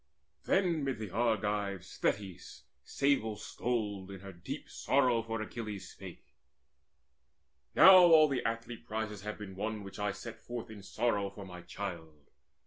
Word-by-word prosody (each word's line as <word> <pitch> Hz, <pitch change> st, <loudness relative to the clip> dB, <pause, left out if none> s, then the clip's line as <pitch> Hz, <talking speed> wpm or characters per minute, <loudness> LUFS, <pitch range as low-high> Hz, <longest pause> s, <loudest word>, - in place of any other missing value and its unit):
Then 175 Hz, -6 st, +2 dB
mid 135 Hz, -3 st, -1 dB
the 105 Hz, -4 st, -6 dB
Argives 105 Hz, -4 st, -1 dB
Thetis 100 Hz, -3 st, -2 dB, 0.2 s
sable 140 Hz, -6 st, +1 dB
stoled 105 Hz, -4 st, -3 dB
In 95 Hz, -1 st, -8 dB
her 100 Hz, -1 st, -9 dB
deep 85 Hz, +1 st, -7 dB
sorrow 125 Hz, -4 st, +2 dB
for 115 Hz, 0 st, -4 dB
Achilles 105 Hz, -4 st, -6 dB
spake; -, -, -11 dB, 1.5 s
"Now 190 Hz, 0 st, +10 dB
all 165 Hz, -4 st, +8 dB
the 135 Hz, -3 st, -1 dB
athlete 115 Hz, +1 st, -4 dB
prizes 110 Hz, -2 st, -3 dB
have 105 Hz, +1 st, -5 dB
been 95 Hz, -3 st, -8 dB
won 105 Hz, +1 st, -3 dB
Which 100 Hz, +1 st, -9 dB
I 105 Hz, -1 st, 0 dB
set 115 Hz, +3 st, -8 dB
forth 120 Hz, -2 st, -7 dB
in 105 Hz, -2 st, -9 dB
sorrow 100 Hz, -1 st, 0 dB
for 100 Hz, 0 st, -10 dB
my 90 Hz, -2 st, -9 dB
child. 85 Hz, -5 st, -7 dB
105 Hz, 145 wpm, -32 LUFS, 100-120 Hz, 1.5 s, Now